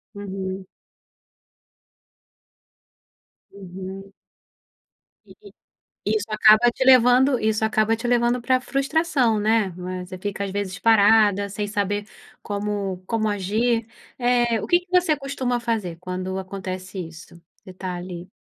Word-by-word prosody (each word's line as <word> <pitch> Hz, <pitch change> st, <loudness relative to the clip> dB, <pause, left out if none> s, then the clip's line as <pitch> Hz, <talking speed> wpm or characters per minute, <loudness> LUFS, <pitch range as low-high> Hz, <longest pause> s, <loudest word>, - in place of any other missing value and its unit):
Uhum. 190 Hz, -1 st, -5 dB, 2.9 s
Uhum. 190 Hz, 0 st, -9 dB, 1.2 s
E -, -, -15 dB, 0.2 s
i -, -, -23 dB, 0.6 s
isso 210 Hz, 0 st, -2 dB
acaba 215 Hz, +2 st, +6 dB
te 260 Hz, -, -2 dB
levando 255 Hz, +1 st, +5 dB
isso 220 Hz, 0 st, 0 dB
acaba 220 Hz, 0 st, +2 dB
te 230 Hz, +2 st, -4 dB
levando 240 Hz, 0 st, +2 dB
pra 255 Hz, +1 st, +2 dB
frustração, 275 Hz, -3 st, +1 dB
né? 215 Hz, -2 st, +2 dB
Mas 180 Hz, 0 st, -6 dB
você 185 Hz, -1 st, -8 dB
fica, 200 Hz, +1 st, -4 dB
às 195 Hz, -, -3 dB
vezes, 190 Hz, -2 st, -3 dB
parada, 205 Hz, -1 st, +4 dB
sem 205 Hz, +1 st, -4 dB
saber 205 Hz, 0 st, -2 dB, 0.4 s
como 200 Hz, -2 st, -3 dB
como 220 Hz, -1 st, 0 dB
agir, 220 Hz, +4 st, 0 dB, 0.3 s
eh, 240 Hz, -2 st, +2 dB
o -, -, -5 dB
quê 350 Hz, -, +3 dB
que 360 Hz, -, -25 dB
você 355 Hz, -4 st, +3 dB
costuma 265 Hz, -3 st, -2 dB
fazer 220 Hz, -8 st, -2 dB
quando 185 Hz, +1 st, -4 dB
acontece 185 Hz, 0 st, -7 dB
isso? 165 Hz, +1 st, -14 dB, 0.2 s
Você 185 Hz, -, -12 dB
tá 185 Hz, 0 st, -5 dB
ali 175 Hz, 0 st, -8 dB
210 Hz, 125 wpm, -23 LUFS, 190-240 Hz, 2.9 s, acaba